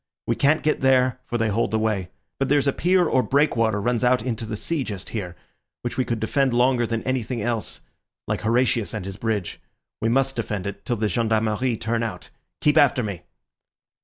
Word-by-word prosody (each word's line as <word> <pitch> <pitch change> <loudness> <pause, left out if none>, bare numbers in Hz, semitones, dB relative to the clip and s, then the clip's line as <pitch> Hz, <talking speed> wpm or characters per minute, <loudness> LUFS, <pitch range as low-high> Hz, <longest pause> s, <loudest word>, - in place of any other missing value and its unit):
We - - 0
can't 150 +3 +2
get 155 - +1
there, 130 -1 +3
for 120 - -1
they 115 -1 +1
hold 110 +3 +1
the 110 - 0
way. 105 -5 -1 0.3
But 135 - 0
there's 145 0 +3
a 140 - +3
pier 180 +1 +3
or 130 - +3
breakwater 115 -4 +2
runs 120 +3 0
out 125 -2 +3
into 115 -3 -3
the 110 -1 -4
sea 160 +5 -1
just 100 -6 -6
here, 90 -6 -5 0.5
which 120 - -3
we 130 - 0
could 115 -2 -2
defend 130 +4 +1
longer 120 0 +3
than 115 -1 -2
anything 130 -1 -2
else, 115 0 -2 0.5
like - - -1
Horatius 115 -1 +1
and 100 -4 -4
his 95 0 -6
bridge. 110 -5 -2 0.4
We 115 - +1
must 135 +2 +2
defend 105 -5 -3
it 100 0 -6
till 120 - 0
the 110 -1 0
Gendarmerie 110 +1 0
turn 115 +2 -1
out. 110 -7 -5 0.3
Keep 150 +1 +3
after 135 -4 +4
me." 100 -5 -4
115 Hz, 200 wpm, -23 LUFS, 110-130 Hz, 0.5 s, after